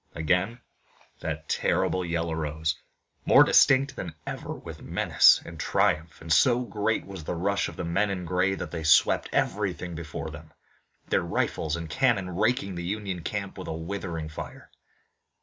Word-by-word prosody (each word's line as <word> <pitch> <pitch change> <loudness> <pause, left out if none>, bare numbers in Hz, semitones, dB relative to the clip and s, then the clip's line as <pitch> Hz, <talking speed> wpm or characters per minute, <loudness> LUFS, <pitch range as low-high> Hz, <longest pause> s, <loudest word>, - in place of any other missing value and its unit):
Again 90 +9 0 0.6
that 80 0 -5
terrible 95 - +1
yell 85 -1 -2
arose, 80 0 -2 0.5
more - - +7
distinct 135 0 +4
than 85 -4 -6
ever - - -5
with - - -8
menace - - +5
and 80 -1 -10
triumph, 80 +2 0
and 80 -1 0
so 125 - +4
great 110 0 -1
was 95 -4 -8
the 80 - -3
rush 100 +4 0
of - - -11
the - - -4
men 95 +5 +1
in 90 -2 -3
gray 90 +2 +1
that - - -6
they 80 -2 -4
swept 80 -2 +4
everything 95 -3 -1
before 80 -1 -6
them, 80 0 -12 0.6
their - - +2
rifles 80 0 -1
and 85 -1 -5
cannon 95 - +1
raking 110 0 +1
the 85 -1 -5
Union 95 -1 -3
camp 100 +2 -4
with 95 - -7
a - - -3
withering 80 -1 -4
fire. 75 - -9
90 Hz, 165 wpm, -27 LUFS, 80-100 Hz, 0.6 s, more